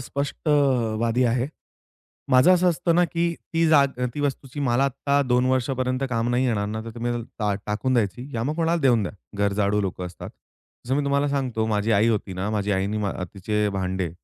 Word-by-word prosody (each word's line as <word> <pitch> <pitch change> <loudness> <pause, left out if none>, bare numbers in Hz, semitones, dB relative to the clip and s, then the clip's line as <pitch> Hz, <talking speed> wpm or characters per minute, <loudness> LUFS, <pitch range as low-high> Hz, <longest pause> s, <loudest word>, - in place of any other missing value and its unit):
स्पष्टवादी 125 -4 0
आहे. 120 +3 +1 0.8
माझं 130 +8 +6
असं 180 0 +3
असतं 170 0 0
ना, 175 +1 +4
की 170 +1 -1 0.2
ती 165 0 +3
जा 150 -3 +6
अ, 125 -2 -1
ती 150 - -3
वस्तूची 140 0 -3
मला 135 0 +2
आता 140 +1 +1
2 125 -1 +2
वर्षापर्यंत 130 0 0
काम 115 0 0
नाही 125 +2 +2
येणार 105 -4 0
ना 110 +1 -4
तर 115 - -6
तुम्ही 120 0 -2
त्याला 120 -1 -3
टा 105 -2 0
टाकून 110 +5 -1
द्यायची 120 +3 -1
या 115 - -1
मग 150 +5 -1
कोणाला 165 0 +1
देऊन 120 -5 +3
द्या, 90 - -4 0.3
गरजाळू 100 0 +1
लोकं 90 -2 -3
असतात. 90 - -9 0.6
जसं 130 - 0
मी 145 - +1
तुम्हाला 140 +1 +1
सांगतो 125 -6 -1
माझी 105 0 0
आई 105 +3 +4
होती 105 -3 -1
ना 95 +3 -3
माझी 105 -1 -1
आईने 100 +2 -1
मा 100 -2 -1 0.2
तिचे 105 +2 0
भांडे 95 -2 -2
120 Hz, 200 wpm, -24 LUFS, 105-140 Hz, 0.8 s, माझं